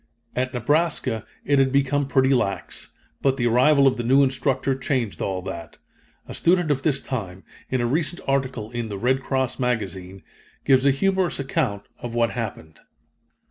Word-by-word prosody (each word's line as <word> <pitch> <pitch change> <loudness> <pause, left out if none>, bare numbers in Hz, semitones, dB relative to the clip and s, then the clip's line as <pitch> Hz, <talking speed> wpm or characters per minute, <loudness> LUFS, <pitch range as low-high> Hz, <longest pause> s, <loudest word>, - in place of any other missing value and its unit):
At 130 +1 -1
Nebraska 130 -3 0 0.2
it 140 -1 +3
had 135 -1 +3
become 140 +1 +1
pretty 135 -1 +3
lax 100 -8 -2 0.3
but 135 -1 +2
the 120 - 0
arrival 140 +5 +5
of 135 -1 +3
the 120 - -2
new 135 +4 +5
instructor 135 0 0
changed 130 -5 -2
all 95 -2 -2
that. 85 -3 -7 0.5
A - - -7
student 175 -2 +2
of 135 -2 0
this 140 -2 0
time, 95 -7 -5 0.3
in 130 -1 0
a - - +1
recent 155 +6 0
article 130 -5 -1
in 120 -2 -4
The 100 - -4
Red 130 +5 +1
Cross 130 -1 -1
Magazine, 95 -6 -3 0.4
gives 135 0 +4
a - - +7
humorous 190 +5 0
account 135 -7 -1 0.2
of 120 -1 -6
what 115 -1 +2
happened. 100 -9 -6
130 Hz, 170 wpm, -23 LUFS, 115-140 Hz, 0.5 s, a